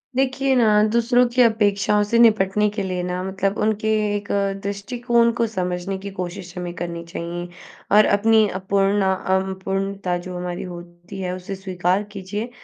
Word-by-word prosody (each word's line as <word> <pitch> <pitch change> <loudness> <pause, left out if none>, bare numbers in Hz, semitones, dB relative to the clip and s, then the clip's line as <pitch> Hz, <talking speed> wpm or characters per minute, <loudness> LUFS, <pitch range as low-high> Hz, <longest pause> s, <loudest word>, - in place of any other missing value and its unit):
देखिए 265 +1 +1
ना, 215 -4 +4
दूसरों 240 +2 +3
की 250 +1 +2
अपेक्षाओं 210 -2 +3
से 230 +3 +1
निपटने 210 -2 +4
के 205 - -1
लिए 185 -1 -2
ना, 180 0 -3
मतलब 195 +1 -2
उनके 215 0 0 0.3
एक 205 -1 -4 0.4
दृष्टिकोण 235 +4 +1
को 230 - +2
समझने 185 -2 -3
की 200 +1 -7
कोशिश 180 -1 -6
हमें 175 -1 -4
करनी 170 -1 -5
चाहिए। 170 +1 -5 0.5
और 215 - +7
अपनी 220 +1 +4
अपूर्ण 195 +1 +1
अम, 190 +1 -1
पूर्णता 195 -2 -2
जो 180 +1 -7
हमारी 180 0 -4
होती 175 +1 -10
है, 180 -1 -3
उसे 185 +2 -6
स्वीकार 185 0 -1
कीजिए, 205 +3 -5
195 Hz, 155 wpm, -22 LUFS, 180-215 Hz, 0.5 s, और